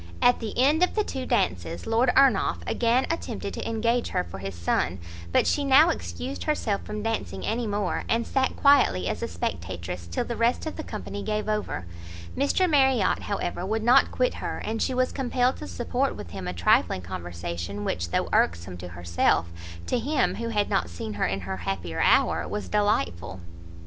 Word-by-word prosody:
At 245 Hz, 0 st, +4 dB
the 220 Hz, -3 st, -5 dB
end 290 Hz, +6 st, +4 dB
of 360 Hz, -, +2 dB
the 425 Hz, -, +2 dB
two 260 Hz, -9 st, -5 dB
dances, 85 Hz, -1 st, -1 dB
Lord 230 Hz, +3 st, +3 dB
Ernolf 265 Hz, -7 st, +4 dB
again 240 Hz, +2 st, +2 dB
attempted 330 Hz, -, -4 dB
to -, -, -4 dB
engage 230 Hz, +2 st, +1 dB
her -, -, -1 dB
for 90 Hz, +2 st, -9 dB
his 95 Hz, -1 st, -5 dB
son, 85 Hz, +1 st, 0 dB, 0.3 s
but -, -, +3 dB
she 290 Hz, -, +1 dB
now 280 Hz, +4 st, +6 dB
excused 270 Hz, -3 st, -5 dB
herself 225 Hz, -10 st, 0 dB
from 210 Hz, 0 st, -5 dB
dancing 225 Hz, 0 st, -3 dB
any 230 Hz, +1 st, -1 dB
more, 205 Hz, 0 st, -1 dB
and 230 Hz, +1 st, +1 dB
sat 265 Hz, -1 st, 0 dB
quietly 185 Hz, -, +4 dB
as -, -, -2 dB
a -, -, -1 dB
spectatress 85 Hz, 0 st, -4 dB
till 85 Hz, -, -2 dB
the 235 Hz, -, -4 dB
rest 235 Hz, +6 st, +1 dB
of 315 Hz, -, -4 dB
the 315 Hz, -, -5 dB
company 210 Hz, -3 st, -6 dB
gave 215 Hz, +1 st, -2 dB
over. 210 Hz, -, -2 dB, 0.5 s
Mr 285 Hz, +7 st, +2 dB
Marriot, 265 Hz, -, +3 dB
however, 180 Hz, -3 st, -3 dB
would 220 Hz, +3 st, -1 dB
not 245 Hz, +4 st, +5 dB
quit -, -, +1 dB
her, -, -, -3 dB
and 225 Hz, +1 st, -2 dB
she 260 Hz, -, 0 dB
was 255 Hz, 0 st, +1 dB
compelled 255 Hz, -1 st, 0 dB
to -, -, -7 dB
support 250 Hz, +3 st, -1 dB
with 85 Hz, -, -9 dB
him 95 Hz, -1 st, -6 dB
a 90 Hz, -, -2 dB
trifling 85 Hz, +1 st, +2 dB
conversation, 85 Hz, +2 st, -5 dB
which, 85 Hz, 0 st, -2 dB
though -, -, 0 dB
irksome 85 Hz, +1 st, +1 dB
to 90 Hz, +1 st, -7 dB
herself, 85 Hz, -1 st, +1 dB, 0.4 s
to 250 Hz, -, 0 dB
him, 275 Hz, +3 st, +1 dB
who 230 Hz, -, -2 dB
had 210 Hz, -2 st, +1 dB
not 85 Hz, -, 0 dB
seen 95 Hz, +5 st, -6 dB
her 100 Hz, -, 0 dB
in 95 Hz, 0 st, -2 dB
her 95 Hz, +1 st, -4 dB
happier 85 Hz, -2 st, -3 dB
hour, -, -, +3 dB
was 210 Hz, -, -4 dB
delightful. 95 Hz, -, 0 dB
210 Hz, 190 wpm, -26 LUFS, -, 0.5 s, now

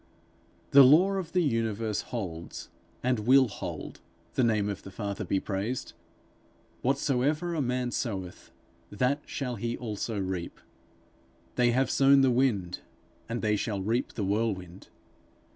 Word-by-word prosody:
The 140 Hz, -, +9 dB
law 155 Hz, +9 st, +7 dB
of 185 Hz, -4 st, -3 dB
the 180 Hz, -1 st, +3 dB
universe 115 Hz, -5 st, -1 dB
holds, 85 Hz, -8 st, -6 dB, 0.3 s
and 125 Hz, -2 st, +1 dB
will 130 Hz, +4 st, +5 dB
hold, -, -, -7 dB, 0.3 s
the 130 Hz, -, +2 dB
name 110 Hz, -3 st, +2 dB
of 100 Hz, -2 st, -4 dB
the -, -, -10 dB
Father 100 Hz, 0 st, -4 dB
be 95 Hz, -, 0 dB
praised: 105 Hz, +6 st, -3 dB, 0.9 s
'Whatsoever 140 Hz, +5 st, +1 dB
a 160 Hz, -, 0 dB
man 125 Hz, -1 st, -1 dB
soweth, 95 Hz, -8 st, -4 dB, 0.4 s
that 125 Hz, +8 st, 0 dB
shall 125 Hz, -4 st, -3 dB
he 115 Hz, +3 st, -3 dB
also 110 Hz, -2 st, -4 dB
reap.' 95 Hz, -3 st, -4 dB, 0.9 s
'They 125 Hz, -1 st, +3 dB
have 130 Hz, +1 st, +2 dB
sown 135 Hz, 0 st, +5 dB
the 135 Hz, -1 st, +4 dB
wind, 110 Hz, -9 st, +1 dB, 0.5 s
and 115 Hz, 0 st, -3 dB
they 105 Hz, -1 st, +2 dB
shall 105 Hz, 0 st, -2 dB
reap 115 Hz, +5 st, -1 dB
the 105 Hz, -, -3 dB
whirlwind.' 95 Hz, -3 st, -2 dB
115 Hz, 140 wpm, -28 LUFS, 100-130 Hz, 0.9 s, The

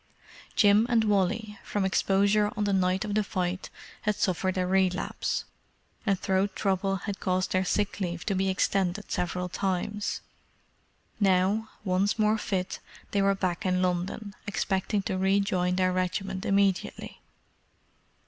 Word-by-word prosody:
Jim 210 Hz, +1 st, +5 dB
and 230 Hz, -2 st, +4 dB
Wally, 210 Hz, +1 st, 0 dB
from 205 Hz, -2 st, -1 dB
exposure 200 Hz, +2 st, +2 dB
on 210 Hz, -, +1 dB
the 205 Hz, -1 st, +1 dB
night 185 Hz, 0 st, +1 dB
of 210 Hz, -, -3 dB
the 215 Hz, 0 st, +2 dB
fight, 185 Hz, -2 st, -2 dB, 0.3 s
had 210 Hz, 0 st, 0 dB
suffered 185 Hz, -1 st, 0 dB
a 185 Hz, -, +1 dB
relapse, 185 Hz, 0 st, 0 dB, 0.6 s
and 195 Hz, -2 st, +2 dB
throat 190 Hz, +1 st, 0 dB
trouble 195 Hz, -1 st, 0 dB
had 200 Hz, +1 st, -5 dB
caused 185 Hz, 0 st, 0 dB
their 185 Hz, 0 st, +2 dB
sick 205 Hz, +2 st, -1 dB
leave 175 Hz, -3 st, -3 dB
to 205 Hz, -, 0 dB
be 190 Hz, 0 st, +1 dB
extended 190 Hz, +1 st, 0 dB
several 180 Hz, 0 st, -1 dB
times. 195 Hz, +3 st, -2 dB, 1.0 s
Now, 195 Hz, +2 st, +2 dB
once 195 Hz, +2 st, +1 dB
more 215 Hz, 0 st, +2 dB
fit, 190 Hz, -2 st, -2 dB, 0.3 s
they 200 Hz, -, +2 dB
were 195 Hz, 0 st, +3 dB
back 185 Hz, 0 st, -2 dB
in 185 Hz, -1 st, +1 dB
London, 185 Hz, +3 st, -2 dB
expecting 195 Hz, 0 st, 0 dB
to 185 Hz, 0 st, -2 dB
rejoin 190 Hz, -2 st, +2 dB
their 185 Hz, 0 st, +2 dB
regiment 185 Hz, +1 st, -2 dB
immediately. 195 Hz, -1 st, 0 dB
195 Hz, 140 wpm, -28 LUFS, 185-205 Hz, 1.0 s, Jim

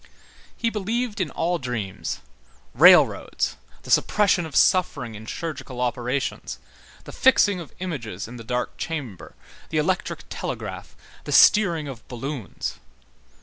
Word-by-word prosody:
He 230 Hz, -, 0 dB
believed 220 Hz, +1 st, -2 dB
in 170 Hz, -, -1 dB
all 175 Hz, +1 st, -1 dB
dreams, 110 Hz, -7 st, -4 dB, 0.5 s
railroads, -, -, +5 dB, 0.3 s
the -, -, -7 dB
suppression 195 Hz, -5 st, +3 dB
of 145 Hz, -, -11 dB
suffering 150 Hz, -, +3 dB
in 110 Hz, +1 st, -10 dB
chirurgical 155 Hz, -6 st, -5 dB
operations, 125 Hz, +2 st, -2 dB, 0.5 s
the -, -, -10 dB
fixing 205 Hz, -7 st, +4 dB
of 165 Hz, -5 st, -9 dB
images 120 Hz, -, -5 dB
in 120 Hz, +2 st, -9 dB
the 115 Hz, -, -9 dB
dark 125 Hz, +2 st, -3 dB
chamber, 135 Hz, -, -6 dB, 0.3 s
the 155 Hz, -, -2 dB
electric 185 Hz, +5 st, -1 dB
telegraph, -, -, -6 dB, 0.3 s
the -, -, -5 dB
steering 170 Hz, -8 st, +5 dB
of 125 Hz, -5 st, -9 dB
balloons. 125 Hz, -2 st, -5 dB
150 Hz, 125 wpm, -24 LUFS, 120-185 Hz, 0.5 s, railroads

